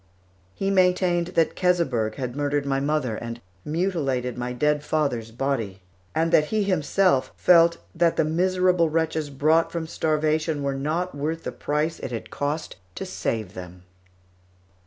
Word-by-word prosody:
He 195 Hz, 0 st, -1 dB
maintained 180 Hz, -2 st, +3 dB
that 165 Hz, -1 st, +2 dB
Keseberg 135 Hz, -12 st, +1 dB
had 125 Hz, -2 st, -4 dB
murdered 145 Hz, 0 st, 0 dB
my 135 Hz, -1 st, 0 dB
mother 140 Hz, -6 st, -1 dB
and 115 Hz, 0 st, -6 dB, 0.2 s
mutilated 150 Hz, -7 st, -1 dB
my 125 Hz, 0 st, -3 dB
dead 150 Hz, +4 st, +1 dB
father's 140 Hz, -8 st, -1 dB
body; 115 Hz, -6 st, -3 dB, 0.3 s
and 165 Hz, +1 st, +1 dB
that 150 Hz, -, +5 dB
he 215 Hz, +6 st, 0 dB
himself 185 Hz, -4 st, +2 dB
felt 170 Hz, -1 st, +5 dB, 0.2 s
that 170 Hz, -1 st, +2 dB
the -, -, +2 dB
miserable 180 Hz, +1 st, +2 dB
wretches 160 Hz, -1 st, -1 dB
brought 155 Hz, +4 st, +2 dB
from 170 Hz, -1 st, -3 dB
starvation 155 Hz, -1 st, 0 dB
were 140 Hz, 0 st, 0 dB
not 155 Hz, +7 st, -2 dB
worth 155 Hz, +3 st, -3 dB
the -, -, -3 dB
price 150 Hz, +2 st, -2 dB
it -, -, -5 dB
had 115 Hz, -, -6 dB
cost 145 Hz, -, -3 dB, 0.2 s
to -, -, -4 dB
save 110 Hz, -5 st, -3 dB
them. 90 Hz, -1 st, -10 dB
150 Hz, 150 wpm, -24 LUFS, 135-170 Hz, 0.3 s, that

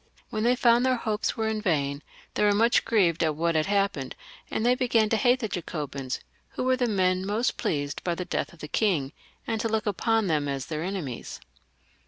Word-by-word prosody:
When 215 Hz, -, -2 dB
they 240 Hz, +3 st, +3 dB
found 240 Hz, -1 st, +4 dB
their 260 Hz, 0 st, +3 dB
hopes 220 Hz, -3 st, -2 dB
were 220 Hz, 0 st, 0 dB
vain 150 Hz, -10 st, 0 dB, 0.3 s
they -, -, -1 dB
were 205 Hz, -1 st, +4 dB
much 230 Hz, +3 st, +3 dB
grieved 180 Hz, -7 st, +2 dB
at 155 Hz, -2 st, +1 dB
what 170 Hz, +2 st, +1 dB
had 155 Hz, -1 st, +1 dB
happened, 195 Hz, -10 st, 0 dB, 0.3 s
and 220 Hz, -, -1 dB
they 245 Hz, -, +5 dB
began 240 Hz, -4 st, +2 dB
to 225 Hz, -, +2 dB
hate 245 Hz, +4 st, +3 dB
the 220 Hz, -, -1 dB
Jacobins, 145 Hz, -8 st, -4 dB, 0.3 s
who -, -, -3 dB
were 255 Hz, 0 st, +3 dB
the 250 Hz, -1 st, 0 dB
men 185 Hz, -3 st, +1 dB
most 210 Hz, +5 st, 0 dB
pleased 145 Hz, -2 st, -2 dB
by 175 Hz, -1 st, 0 dB
the 180 Hz, -, -4 dB
death -, -, -2 dB
of 170 Hz, -, -16 dB
the 150 Hz, -, -5 dB
king, 160 Hz, -8 st, 0 dB, 0.3 s
and 225 Hz, -1 st, -1 dB
to 225 Hz, -, -1 dB
look 220 Hz, -1 st, 0 dB
upon 225 Hz, +2 st, +1 dB
them 155 Hz, -5 st, +1 dB
as 135 Hz, -2 st, -3 dB
their 155 Hz, -1 st, -4 dB
enemies. 170 Hz, -9 st, -5 dB
200 Hz, 210 wpm, -27 LUFS, 155-225 Hz, 0.3 s, they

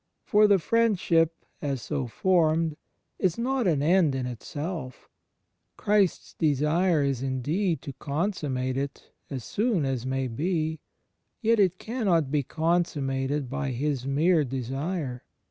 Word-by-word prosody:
For 210 Hz, -1 st, +5 dB
the 200 Hz, -1 st, +5 dB
Friendship, 175 Hz, -5 st, +2 dB, 0.2 s
as 140 Hz, -3 st, -2 dB
so 140 Hz, -4 st, -2 dB
formed, 160 Hz, +2 st, +2 dB, 0.4 s
is 180 Hz, -3 st, +1 dB
not 250 Hz, -1 st, 0 dB
an 150 Hz, -5 st, +2 dB
end 165 Hz, -3 st, +4 dB
in 130 Hz, -1 st, -2 dB
itself. 130 Hz, -, -6 dB, 0.7 s
Christ's 205 Hz, -3 st, +1 dB
desire 155 Hz, +2 st, +2 dB
is 135 Hz, -3 st, -1 dB
indeed 150 Hz, +8 st, -1 dB
to 140 Hz, -, -6 dB
consununate 140 Hz, -5 st, -2 dB
it 140 Hz, +1 st, -5 dB, 0.2 s
as 130 Hz, -4 st, -5 dB
soon 205 Hz, -, 0 dB
as 130 Hz, -3 st, -1 dB
may 130 Hz, 0 st, -1 dB
be; 160 Hz, +5 st, -1 dB, 0.6 s
yet 230 Hz, -1 st, +2 dB
it 185 Hz, -2 st, +3 dB
cannot 190 Hz, -, 0 dB
be 150 Hz, -1 st, +2 dB
consummated 145 Hz, -3 st, 0 dB
by 140 Hz, +2 st, -3 dB
His 135 Hz, +1 st, -2 dB
mere 155 Hz, +4 st, +3 dB
desire. 135 Hz, +2 st, -3 dB
155 Hz, 130 wpm, -27 LUFS, 135-180 Hz, 0.7 s, For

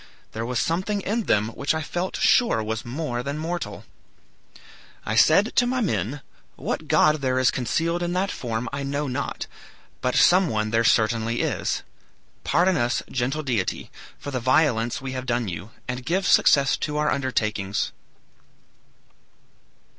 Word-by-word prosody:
There 115 Hz, +1 st, -4 dB
was 125 Hz, 0 st, -2 dB
something 185 Hz, -, 0 dB
in 215 Hz, +3 st, -1 dB
them 105 Hz, +1 st, +2 dB
which 140 Hz, +6 st, -1 dB
I 160 Hz, -, -2 dB
felt 175 Hz, +4 st, -3 dB
sure 235 Hz, -, +3 dB
was 110 Hz, +1 st, -3 dB
more 125 Hz, -1 st, -3 dB
than 140 Hz, +3 st, -4 dB
mortal. 170 Hz, +3 st, -4 dB, 1.2 s
I -, -, -1 dB
said -, -, +4 dB
to 245 Hz, -, +5 dB
my 255 Hz, +1 st, 0 dB
men, 135 Hz, -, -1 dB, 0.3 s
'What -, -, -4 dB
god 155 Hz, 0 st, +4 dB
there 130 Hz, -1 st, 0 dB
is 130 Hz, -1 st, +4 dB
concealed 165 Hz, +8 st, -1 dB
in 175 Hz, 0 st, -1 dB
that 190 Hz, +2 st, 0 dB
form 115 Hz, -1 st, -3 dB
I 140 Hz, -, -3 dB
know 140 Hz, +2 st, -2 dB
not, 135 Hz, +1 st, -3 dB, 0.6 s
but 125 Hz, -, 0 dB
some 180 Hz, -1 st, +5 dB
one 110 Hz, -2 st, -1 dB
there 115 Hz, 0 st, +2 dB
certainly 115 Hz, +1 st, +2 dB
is. -, -, -1 dB, 0.6 s
Pardon 180 Hz, +1 st, +2 dB
us, 120 Hz, -2 st, 0 dB
gentle 135 Hz, +4 st, -1 dB
deity, 120 Hz, -9 st, -2 dB, 0.3 s
for 145 Hz, -, -7 dB
the 130 Hz, -, -1 dB
violence 125 Hz, -2 st, +2 dB
we 135 Hz, -, -4 dB
have 130 Hz, 0 st, -5 dB
done 120 Hz, -1 st, 0 dB
you, 90 Hz, +3 st, -6 dB, 0.2 s
and 125 Hz, 0 st, -4 dB
give 185 Hz, +7 st, 0 dB
success 140 Hz, -5 st, +4 dB
to 150 Hz, -1 st, -3 dB
our 150 Hz, 0 st, +1 dB
undertakings.' 105 Hz, -7 st, -1 dB
130 Hz, 155 wpm, -24 LUFS, 115-160 Hz, 1.2 s, to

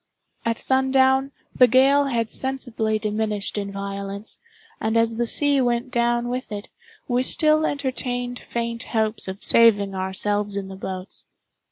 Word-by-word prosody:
At 230 Hz, 0 st, 0 dB
sundown, 265 Hz, +1 st, +2 dB, 0.2 s
the 250 Hz, -, +6 dB
gale 270 Hz, +4 st, +4 dB
had 230 Hz, -5 st, -1 dB
sensibly 245 Hz, -5 st, -2 dB
diminished 210 Hz, -1 st, -2 dB
in 200 Hz, -1 st, -3 dB
violence, 200 Hz, +1 st, -2 dB, 0.4 s
and 220 Hz, +1 st, 0 dB
as 230 Hz, 0 st, +1 dB
the 240 Hz, 0 st, 0 dB
sea 285 Hz, +2 st, +2 dB
went 240 Hz, +1 st, -1 dB
down 240 Hz, 0 st, +1 dB
with 250 Hz, -1 st, -4 dB
it, 205 Hz, 0 st, -6 dB, 0.4 s
we 245 Hz, 0 st, +1 dB
still 310 Hz, +3 st, +4 dB
entertained 245 Hz, -3 st, -3 dB
faint 235 Hz, -1 st, -4 dB
hopes 220 Hz, -1 st, 0 dB
of 190 Hz, +2 st, -7 dB
saving 205 Hz, -4 st, +4 dB
ourselves 200 Hz, +2 st, -1 dB
in 195 Hz, -1 st, -5 dB
the 190 Hz, -, -8 dB
boats. 190 Hz, -1 st, -6 dB
230 Hz, 145 wpm, -23 LUFS, 205-255 Hz, 0.4 s, the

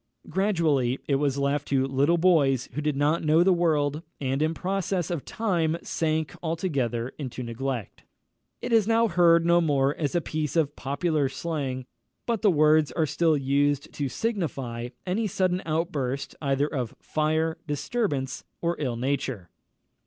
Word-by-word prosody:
Gradually 160 Hz, -9 st, +1 dB
it 140 Hz, -, +2 dB
was 140 Hz, -1 st, 0 dB
left 140 Hz, +1 st, 0 dB
to 135 Hz, -1 st, +2 dB
little 140 Hz, +5 st, +2 dB
boys 145 Hz, -8 st, +3 dB
who 150 Hz, -, -2 dB
did 150 Hz, -1 st, 0 dB
not 150 Hz, +4 st, +1 dB
know 155 Hz, +2 st, +4 dB
the 190 Hz, +1 st, +5 dB
world, 155 Hz, -4 st, +1 dB, 0.2 s
and 135 Hz, 0 st, -1 dB
in 160 Hz, +1 st, +1 dB
process 185 Hz, -2 st, -1 dB
of 170 Hz, -6 st, -3 dB
time 170 Hz, -7 st, 0 dB
sank 155 Hz, -2 st, -1 dB
altogether 140 Hz, -9 st, -1 dB
into 130 Hz, -3 st, -5 dB
neglect. 120 Hz, -1 st, -4 dB, 0.6 s
It -, -, -2 dB
is 220 Hz, -3 st, +4 dB
now 230 Hz, 0 st, +4 dB
heard 170 Hz, -2 st, +4 dB
no 170 Hz, 0 st, +5 dB
more 140 Hz, -3 st, +2 dB
as 150 Hz, +1 st, -2 dB
a -, -, +4 dB
piece 155 Hz, -2 st, -3 dB
of 150 Hz, -3 st, +1 dB
popular 145 Hz, 0 st, 0 dB
slang; 135 Hz, -4 st, -3 dB, 0.4 s
but 230 Hz, -3 st, -1 dB
the 210 Hz, -, +5 dB
words 155 Hz, -2 st, +4 dB
are 160 Hz, -, +1 dB
still 155 Hz, +1 st, +2 dB
used 140 Hz, +1 st, 0 dB
to 140 Hz, -2 st, -2 dB
signify 135 Hz, -, -3 dB, 0.2 s
any 205 Hz, +4 st, 0 dB
sudden 185 Hz, -1 st, 0 dB
outburst 150 Hz, -5 st, -2 dB
either 140 Hz, -1 st, +1 dB
of 130 Hz, -6 st, -3 dB
fire, 155 Hz, +1 st, 0 dB
disturbance, 145 Hz, -, -2 dB, 0.2 s
or 170 Hz, 0 st, 0 dB
ill 125 Hz, -5 st, -1 dB
nature. 130 Hz, -, -2 dB
150 Hz, 155 wpm, -26 LUFS, 135-170 Hz, 0.6 s, the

